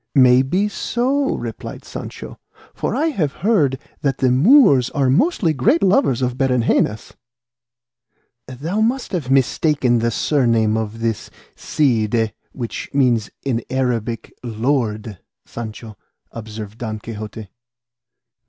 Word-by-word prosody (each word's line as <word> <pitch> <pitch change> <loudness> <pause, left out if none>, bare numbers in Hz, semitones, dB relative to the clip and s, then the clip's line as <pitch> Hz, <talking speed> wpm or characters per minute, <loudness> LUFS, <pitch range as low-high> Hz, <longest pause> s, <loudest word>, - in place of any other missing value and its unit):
"May 130 -1 +6
be 180 +10 0
so," 260 +6 -1
replied - - -7
Sancho; - - -8 0.3
"for - - -2
I 325 - +1
have 160 - -1
heard 175 - +3
say - - -29
that 135 -2 0
the 130 -1 +2
Moors 145 - +5
are 135 -3 +1
mostly 200 - +2
great 145 +6 +2
lovers 140 - +3
of 125 0 -2
berengenas." 120 -4 +1 1.3
"Thou 155 - -3
must 245 +4 0
have 165 -10 -3
mistaken 135 -2 +2
the 115 +1 +1
surname 115 -4 +1
of 110 0 -4
this 115 -2 -2 0.3
'Cide' 115 -5 0 0.2
which 120 -3 -6
means 120 -6 +2
in 120 -4 -1
Arabic 120 -3 -2
'Lord' 110 - -2 0.3
Sancho," 110 -1 -8 0.4
observed 110 -1 -8
Don 110 -3 -4
Quixote. 110 -1 -8
125 Hz, 120 wpm, -20 LUFS, 115-150 Hz, 1.3 s, May